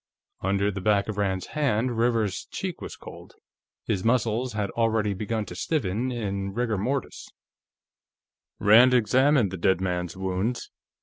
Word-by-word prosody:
Under 100 +2 +1
the 100 -1 -5
back 100 0 +2
of 105 - -4
Rand's 95 -2 -1
hand, 130 -5 0
Rivers's 115 -4 0
cheek - - -5
was - - -7
cold; - - -12 0.5
his 95 - -1
muscles 115 +1 +1
had 105 -2 -2
already 110 -3 +1
begun 110 +2 -3
to - - -9
stiffen 125 - -1
in 100 -4 -3
rigor 115 -4 0
mortis. 130 +7 -3 1.3
Rand 120 +5 +6
examined 125 -1 +3
the 95 - -5
dead 95 +1 +2
man's 90 -1 -3
wounds. 95 +6 -2
105 Hz, 140 wpm, -26 LUFS, 95-120 Hz, 1.3 s, Rand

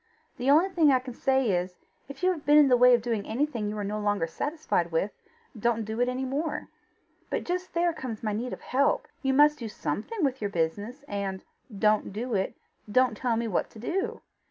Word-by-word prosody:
The 250 +2 0
only 320 +7 +5
thing 330 -6 +4
I 260 - +5
can 255 -1 -7
say 265 -2 +2
is: 180 0 -1 0.3
if 275 - -10
you 370 - +4
have 320 -5 -5
been 295 +1 +5
in 295 -2 +7
the 250 - +6
way 250 0 +7
of 235 - -2
doing 230 -4 -1
anything 235 -3 -1
you 210 - -4
are 205 - -2
no 210 +1 -3
longer 205 -4 +1
satisfied 180 - -2
with, 165 +5 0 0.4
don't 230 0 0
do 220 +3 -3
it 245 - +2
any 255 +1 -2
more." 290 +5 -3 0.6
"But - - -2
just 360 0 -4
there 340 0 +2
comes 245 -8 -6
my 215 -1 -1
need 235 +4 -3
of - - -7
help. 280 - +1
You 270 -2 +1
must 295 +1 +5
do 230 -3 -5
something 210 - -3
with 265 -2 -2
your 205 - -1
business, 205 - -2
and 200 -6 -4 0.3
DON'T 215 0 +2
DO 235 +4 -3
IT, 190 -2 0 0.4
don't 255 -1 +3
tell 235 +1 0
me 230 0 -1
what 200 - -1
to - - -15
do. 350 - -2
245 Hz, 220 wpm, -27 LUFS, 210-285 Hz, 0.6 s, in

